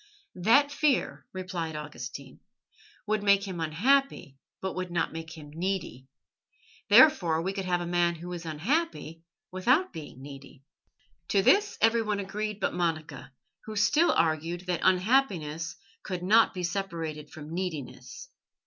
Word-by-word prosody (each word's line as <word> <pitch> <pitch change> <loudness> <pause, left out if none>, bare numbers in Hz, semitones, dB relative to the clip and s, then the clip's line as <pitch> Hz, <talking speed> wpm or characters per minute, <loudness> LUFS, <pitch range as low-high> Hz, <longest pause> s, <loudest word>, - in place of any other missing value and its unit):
"That 280 +9 +4
fear," 290 -2 0
replied 180 -4 -4
Augustine, 140 -3 -8 0.7
"would 215 0 0
make 200 0 +3
him 180 -3 -5
unhappy 165 - +1 0.2
but 190 -1 -3
would 185 0 -4
not 175 -2 -1
make 160 0 -8
him 150 -2 -11
needy. 170 -7 -3 0.8
Therefore 175 - +6
we 190 +2 -2
could 195 -1 -4
have 175 -1 0
a - - -3
man 175 0 +1
who 175 +2 -7
is 175 -1 -6
unhappy 165 - -2 0.3
without 255 - +2
being 155 -6 -9
needy." 140 -1 -12 0.6
To 195 -1 +2
this 410 - +3
everyone 225 -2 +2
agreed 210 +1 -4
but - - -1
Monica, 160 -6 -3 0.3
who 215 - -7
still 290 +11 +3
argued 165 +1 0
that 180 -2 -2
unhappiness 180 - +1 0.3
could 180 -2 -5
not 220 +5 +5
be 180 - -4
separated 165 -5 -4
from 155 +1 -10
neediness. 150 -8 -6
180 Hz, 140 wpm, -28 LUFS, 160-205 Hz, 0.8 s, Therefore